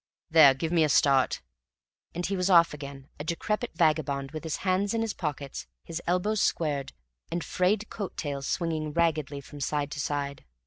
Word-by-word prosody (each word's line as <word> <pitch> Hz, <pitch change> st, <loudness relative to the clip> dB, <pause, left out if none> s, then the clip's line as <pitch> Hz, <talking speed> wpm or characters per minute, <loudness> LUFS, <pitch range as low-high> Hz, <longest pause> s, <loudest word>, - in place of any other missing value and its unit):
There 150 Hz, -5 st, +8 dB
give 160 Hz, +4 st, -3 dB
me 170 Hz, -2 st, +4 dB
a 155 Hz, -, +2 dB
start." 135 Hz, -2 st, +3 dB, 0.7 s
And 175 Hz, +1 st, -2 dB
he 195 Hz, -, -1 dB
was 180 Hz, 0 st, 0 dB
off 170 Hz, -3 st, +6 dB
again, 140 Hz, -2 st, -9 dB
a -, -, -3 dB
decrepit 210 Hz, +8 st, -2 dB
vagabond, 145 Hz, -4 st, +1 dB
with 155 Hz, 0 st, -6 dB
his 160 Hz, -2 st, -2 dB
hands 195 Hz, +3 st, +1 dB
in 225 Hz, -, +1 dB
his 225 Hz, -2 st, -1 dB
pockets, 140 Hz, -, -5 dB, 0.2 s
his 165 Hz, +1 st, -5 dB
elbows 190 Hz, +4 st, +1 dB
squared, 145 Hz, -4 st, 0 dB, 0.4 s
and 170 Hz, 0 st, -2 dB
frayed 200 Hz, +4 st, +1 dB
coat 200 Hz, -5 st, -5 dB
tails 140 Hz, -3 st, -3 dB
swinging 155 Hz, -3 st, -1 dB
raggedly 155 Hz, -4 st, 0 dB
from 145 Hz, +1 st, -11 dB
side 145 Hz, +1 st, -1 dB
to 150 Hz, -, -5 dB
side. 140 Hz, -1 st, -2 dB
155 Hz, 180 wpm, -28 LUFS, 140-175 Hz, 0.7 s, There